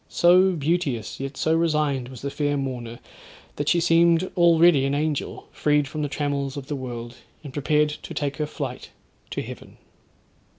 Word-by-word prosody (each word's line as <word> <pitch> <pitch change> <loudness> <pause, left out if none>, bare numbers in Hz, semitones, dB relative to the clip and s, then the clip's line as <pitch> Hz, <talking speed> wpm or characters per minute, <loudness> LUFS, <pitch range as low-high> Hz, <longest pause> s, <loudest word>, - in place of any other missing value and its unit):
So 185 +2 +5
beauteous, 150 - -1
yet 135 0 -5
so 160 - +1
resigned 150 -6 +1
was 130 -2 -11
the 140 - -3
fair 145 0 -1
mourner, 125 -4 -4 0.6
that 145 0 -1
she 175 - +3
seemed 170 +1 +3
already 170 -4 +5
an 135 +1 0
angel 150 -1 -2
freed 150 -1 +1
from 155 +2 -5
the 145 - -2
trammels 140 -1 -2
of 140 - -6
the 145 - -4
world, 120 -2 -7 0.3
and 140 -3 -9
prepared 150 +1 +2
to 150 - -8
take 140 -2 -2
her 150 -1 -1
flight 135 -5 -6 0.4
to - - -3
heaven. - - -10
145 Hz, 170 wpm, -24 LUFS, 135-160 Hz, 0.6 s, So